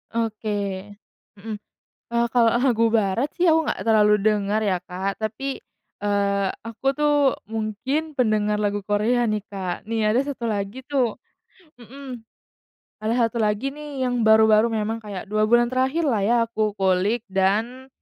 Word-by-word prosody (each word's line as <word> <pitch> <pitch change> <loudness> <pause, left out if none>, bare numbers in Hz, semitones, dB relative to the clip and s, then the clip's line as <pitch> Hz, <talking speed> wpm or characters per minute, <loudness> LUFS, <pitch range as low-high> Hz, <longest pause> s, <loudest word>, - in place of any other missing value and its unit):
Oke. 225 -1 -2 0.9
Mhm. 215 +2 -6 0.6
E - - -3
kalau 230 -1 +3
lagu 235 -4 +3
barat 220 +4 +1
sih 355 -1 +2
aku 320 0 +3
nggak - - -2
terlalu 210 -1 +5
dengar 210 0 +1
ya, 195 -4 +1
Kak, 190 +2 -4
tapi 225 +5 -4 0.5
eee, 200 -1 +1 0.2
aku 230 +3 -11
tuh 295 +1 +1 0.4
mungkin 225 +8 -2
pendengar 215 -5 +1
lagu 205 -1 -1
Korea 220 +4 +1
nih, 215 -2 -1
Kak. 190 -1 -5
Nih, 225 -1 0
ada 215 +4 +3
1 275 -4 -5
lagi 215 +3 -3
tuh, 260 -6 0 0.6
mhm. 250 0 -10 0.8
Ada 230 +2 +1
1 230 +1 -4
lagi 215 +5 0
nih, 290 -2 -5
yang 245 -1 0
baru-baru 220 0 +5
memang 225 0 -2
kayak 205 -4 -7
2 215 +1 +1
bulan 240 +1 +4
terakhirlah 260 -2 +1
ya, 215 +5 +2
aku 215 -2 -2
kulik 195 +4 +1
dan 220 +7 0
220 Hz, 145 wpm, -23 LUFS, 210-250 Hz, 0.9 s, terlalu